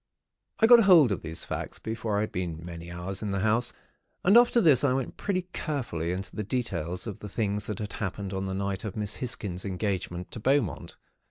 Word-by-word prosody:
"I 225 - +5
got 235 -2 +8
hold 165 - +7
of 100 - -1
these 80 0 -5
facts, - - -5
before 110 -1 -2
I - - +2
had 110 - -2
been 85 -3 -4
many 85 -1 -8
hours 90 +2 -5
in 105 - -2
the 100 -1 -1
house; 110 +3 +2 0.5
and 195 +4 +5
after 240 0 +6
this 150 - +5
I 135 -3 +3
went 130 -2 -2
pretty 185 -3 -1
carefully 115 - -2
into 95 0 -5
the 110 - -2
details 95 -6 -2
of 105 -5 -6
the 105 - -7
things 105 0 -1
that 105 - -3
happened 100 -2 -4
on 95 0 -2
the 95 - -3
night 100 0 -2
of 105 -3 -5
Miss 105 -2 -2
Hisgins' 105 -8 -3
engagement 95 -2 -3
to - - -6
Beaumont. 130 - 0
105 Hz, 205 wpm, -28 LUFS, 95-125 Hz, 0.5 s, got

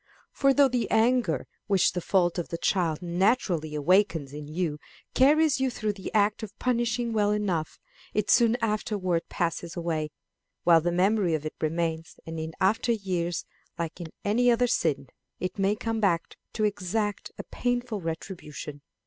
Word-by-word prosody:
For 275 0 +3
though 280 0 +5
the 245 -2 -1
anger 225 - +2 0.2
which 195 -3 +3
the 180 - -2
fault 175 -1 +2
of 170 - -3
the 170 - -3
child 170 -2 0
naturally 175 -4 +1
awakens 165 -2 +2
in 150 0 -7
you 155 -1 -2 0.3
carries 295 +2 +4
you 265 0 +2
through 215 -3 -2
the 195 -2 -7
act 210 0 +2
of 220 -3 -8
punishing 240 -1 0
well 205 -2 +2
enough, 195 -7 -1 0.3
it 210 -1 0
soon 235 -1 +5
afterwards 205 -5 -1
passes 170 0 -2
away, 160 -3 -1 0.5
while 165 -2 +6
the 175 +2 0
memory 185 -1 +2
of 155 -1 -4
it 155 - -4
remains, 165 0 -2
and 165 0 -5
in 160 0 -5
after 215 +5 +2
years, 180 -6 -2 0.3
like 165 0 -4 0.3
any 240 +5 +3
other 240 +1 +4
sin, 145 - 0 0.3
it 185 +2 -4
may 195 +2 +2
come 225 +1 -2
back 175 -6 0 0.2
to 215 - -1
exact 205 +1 -1
a - - -5
painful 245 -4 -2
retribution. 160 -3 -6
190 Hz, 160 wpm, -27 LUFS, 165-220 Hz, 0.5 s, while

